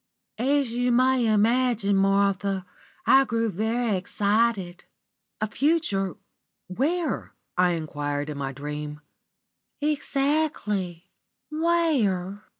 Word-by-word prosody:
"As 275 0 +1
you 245 +1 0
may 255 0 +3
imagine, 220 -1 +2
Martha, 195 -1 +1 0.4
I 270 - +6
grew 230 -3 -1
very 220 +3 0
excited. 200 -1 0 0.6
"'A - - +2
future 230 - 0 0.5
where?' 305 - -2 0.2
I 180 -1 +3
enquired, 145 -3 -3
in 145 - -6
my 135 -1 -2
dream. 150 +2 -6 0.8
"Exactly. 275 - -1 0.4
Where? 270 - +1
210 Hz, 90 wpm, -25 LUFS, 185-260 Hz, 0.8 s, I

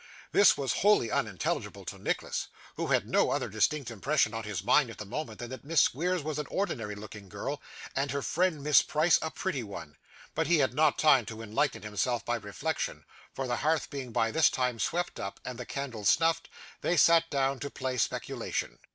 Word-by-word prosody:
This 200 - +6
was 135 -4 0
wholly 200 - +4
unintelligible - - -2
to - - -7
Nicholas, - - -2 0.3
who - - -2
had - - +2
no - - +3
other - - -1
distinct 120 +6 0
impression 115 +1 +1
on 110 -1 -4
his 100 -4 -4
mind 130 +4 +4
at 115 - -9
the 105 - -6
moment, 115 0 -5
than 120 0 -7
that 130 - -7
Miss 160 +2 +2
Squeers 175 +4 +2
was 150 0 -3
an 150 - -3
ordinary 120 - -2
looking 105 -1 -10
girl, 135 +9 -4 0.3
and 135 +1 0
her 140 +1 -2
friend 175 -4 0
Miss 150 0 +6
Price 155 +3 +3
a 160 - -2
pretty 160 -5 -3
one; 100 -9 -8 0.4
but 160 +1 0
he 175 - +4
had 135 -4 +2
not 150 +1 +3
time 145 -5 +5
to 115 -1 -7
enlighten 125 +2 -1
himself 105 +4 -1
by 120 0 0
reflection, 115 +9 -4 0.3
for 135 - -2
the 120 -1 -1
hearth 155 +1 0
being 135 -4 -5
by 115 0 +1
this 160 +4 +5
time 125 -2 -1
swept 175 +7 -1
up, 100 - -5
and 125 -1 -6
the 125 - -6
candle 130 -6 -5
snuffed, 165 - +3 0.3
they 175 - +1
sat 165 +1 +5
down 135 -1 0
to 140 - -4
play 130 -2 -3
speculation. - - -2
135 Hz, 205 wpm, -30 LUFS, 115-155 Hz, 0.4 s, This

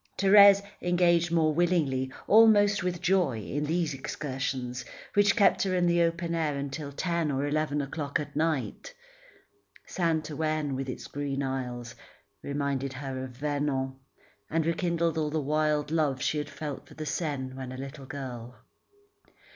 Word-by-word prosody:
Thérèse 200 0 +7 0.2
engaged 175 -1 +3
more 160 -2 +3
willingly, 150 -6 +1
almost 210 -2 +6
with 180 -1 -3
joy, 180 -10 +2
in 145 +7 -3
these 165 0 0
excursions 130 -2 -4 0.3
which 205 0 +4
kept 205 - +4
her 190 -2 +1
in 180 -1 +2
the 170 0 +3
open 170 0 0
air 155 -4 0
until 140 +1 -5
ten 170 +1 -1
or 140 0 0
eleven 150 0 0
o'clock 140 0 -3
at 150 - -7
night. 160 - -2 0.9
Saint 165 -3 -1
Ouen, 155 -2 -1
with 135 0 -4
its 125 - -6
green 140 -1 -3
isles, 125 -3 -4 0.5
reminded 140 -1 -2
her 130 -1 -5
of 130 - -6
Vernon, 145 -2 -1 0.6
and 160 0 0
rekindled 170 -1 0
all 155 -1 0
the 155 +1 -1
wild 150 0 0
love 150 -5 +1
she 150 - 0
had 145 0 -4
felt 145 0 -6
for - - -15
the 155 - -5
Seine 135 -3 -3
when 130 -1 -7
a 130 - -7
little 135 +1 -8
girl. 125 -4 -7
150 Hz, 155 wpm, -28 LUFS, 135-170 Hz, 0.9 s, Thérèse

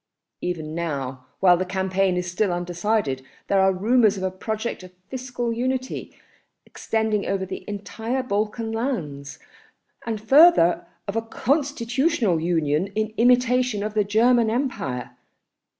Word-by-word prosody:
Even 160 -3 -3
now, 135 -6 -4
while 180 -2 +6
the 185 - 0
campaign 190 0 0
is 180 - -1
still 190 +2 +1
undecided, 175 -4 -1 0.2
there 195 - +2
are 190 0 +4
rumours 215 +2 +3
of 190 - -5
a 190 - 0
project 220 +4 -4
of 185 -1 -12 0.2
fiscal 245 -2 -3
unity, 255 +2 -3 0.5
extending 220 -2 -1
over 195 -1 -1
the - - -7
entire 225 +5 -3
Balkan 220 0 -2
lands, 150 - -3 0.7
and 225 -2 -3
further 220 - +5 0.2
of 200 - -3
a 225 - +1
constitutional 265 - 0
union 160 0 +1
in 215 0 -1
imitation 250 -2 +3
of 210 0 -3
the 215 -1 +2
German 230 +3 +3
Empire. 220 - -2
210 Hz, 135 wpm, -23 LUFS, 180-240 Hz, 0.7 s, while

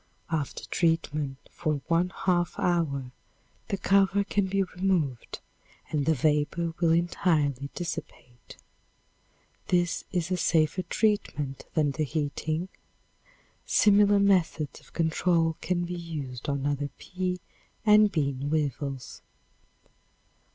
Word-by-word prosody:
After 150 -4 -2
treatment 150 -4 0
for 155 -3 -1
one 170 +2 +2 0.2
half 175 -2 +2
hour, 140 -7 0 0.6
the 200 - -1
cover 195 +1 +3
can 200 -1 0
be 195 +1 +1
removed 180 -9 -1 0.5
and 150 -2 0
the 160 - +4
vapor 150 +4 +1
will 170 -2 +3
entirely 155 -5 +1
dissipate. 165 -8 -7 1.1
This 175 -1 +1
is 175 -1 -1
a 185 - +1
safer 160 +1 +2
treatment 180 - -1
than 150 -3 +2
the 155 +2 -1
heating. 155 +3 -2 1.0
Similar 205 0 +5
methods 180 -6 +2
of - - -21
control 165 0 +1
can 175 -1 0
be 175 - -5
used 145 -7 -6
on 140 -1 -1
other 145 0 -1
pea 180 0 -3 0.5
and 210 -1 +6
bean 140 -4 -1
weevils. 140 -3 -2
165 Hz, 110 wpm, -28 LUFS, 145-180 Hz, 1.1 s, and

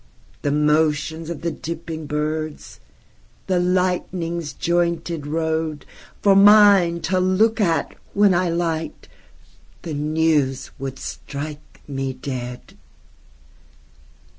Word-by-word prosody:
The - - 0
motions 150 +2 +1
of 170 -4 -5
the 170 0 -1
dipping 160 0 -6
birds, 155 +1 -3 0.7
The 185 -2 +1
lightning's 180 -3 -1
jointed 170 -1 -1
road, 160 -1 -2 0.4
For 200 -1 +6
mine 200 -4 +6
to 185 +3 0
look 210 +5 +2
at 170 -5 +1 0.2
when 200 -1 +5
I 175 0 +1
liked,—The 160 - -6
news 150 -3 0
would 135 0 -5
strike 150 +1 -8
me 135 -2 -3
dead! 125 -2 -7
160 Hz, 95 wpm, -22 LUFS, 150-175 Hz, 0.7 s, For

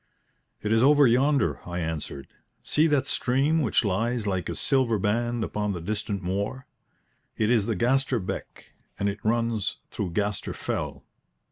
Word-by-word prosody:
"It 105 - -1
is 115 0 +4
over 145 +2 +6
yonder," 135 +4 +3
I 90 0 -5
answered. 80 -4 -4 0.4
"See 155 +2 +3
that 145 -4 +2
stream 140 +5 +1
which 120 -3 +2
lies 115 +4 0
like 95 -3 -1
a - - -3
silver 130 -5 +2
band 115 +4 0
upon 105 -1 -2
the 90 - -4
distant 100 +2 -3
moor? 100 +8 -2 0.7
It 110 +1 +2
is 110 -4 +3
the 115 - 0
Gaster 130 +5 +2
Beck, 95 - -6 0.3
and 100 - 0
it 100 +1 -3
runs 115 -2 0
through 90 -4 -3
Gaster 105 +1 -1
Fell." - - -4
110 Hz, 155 wpm, -26 LUFS, 100-130 Hz, 0.7 s, over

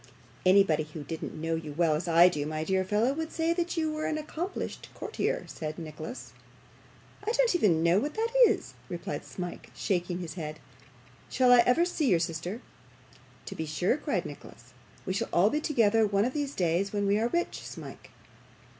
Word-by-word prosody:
'Anybody 185 -5 +5
who 150 0 -7
didn't 160 +1 -6
know 165 +1 -1
you 160 -2 -4
as - - -15
well 170 -3 +3
as 160 +4 -2
I 170 +1 +7
do, 150 -5 -1
my 155 0 -2
dear 190 +2 +1
fellow, 210 +7 +1
would 320 +2 -4
say 330 +1 0
you 320 -3 -1
were 310 0 -2
an 310 - -1
accomplished 320 +4 -5
courtier,' - - -2
said 155 -1 -6
Nicholas. 160 - -8 0.9
'I 440 +3 -1
don't - - +3
even 180 - +3
know 170 +3 +4
what 295 +6 -3
that 450 +1 0 0.2
is,' - - -2 0.2
replied - - -4
Smike, 180 -2 -7
shaking 180 -2 -1
his 170 -4 -6
head. 155 -3 -6 0.7
'Shall 255 -1 +4
I 245 - +8
ever 290 +8 +4
see 315 -6 0
your 175 - +5
sister?' 170 +6 -3 0.8
'To - - -6
be 160 - -4
sure,' 175 - +1
cried - - -2
Nicholas; - - -11 0.3
'we 185 - -1
shall 225 +4 -2
all 195 +5 +4
be 300 - 0
together 225 -7 +3
one 200 +1 +2
of 255 - -2
these 290 -2 -2
days 180 +2 +1
when 205 -1 -1
we 200 +1 +3
are 230 - +2
rich, 345 +7 -2
Smike. - - -9
195 Hz, 190 wpm, -29 LUFS, 165-275 Hz, 0.9 s, I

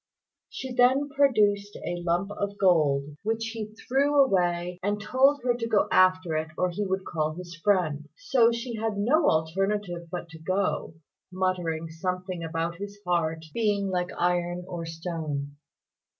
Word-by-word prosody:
She 260 -1 -6
then 260 +3 +4
produced 210 -8 +2
a 175 0 -3
lump 175 +4 0
of 205 0 -3
gold 150 -6 +2
which 225 +1 -1
he 215 -1 -6
threw 285 +3 +3
away, 175 -4 0
and 205 +2 -1
told 260 +6 +3
her 245 -1 +3
to 235 -1 -3
go 220 -3 +2
after 185 -3 +4
it 155 +1 -2
or 180 -1 +1
he 205 +4 -2
would 190 -1 -2
call 155 -2 -2
his 175 -1 -8
friend. 170 -7 +1
So 255 - +3
she 235 0 -4
had 220 -1 -2
no 290 +10 +3
alternative 175 +2 -1
but 175 0 -5
to 160 0 -11
go, 185 -1 -1 0.4
muttering 175 -3 -1
something 180 +1 -3
about 165 +1 -2
his 200 +1 -7
heart 165 -2 0
being 205 -3 +1
like 180 -1 -1
iron 175 0 0
or 170 -3 -5
stone. 160 -4 -4
185 Hz, 155 wpm, -27 LUFS, 170-215 Hz, 0.4 s, then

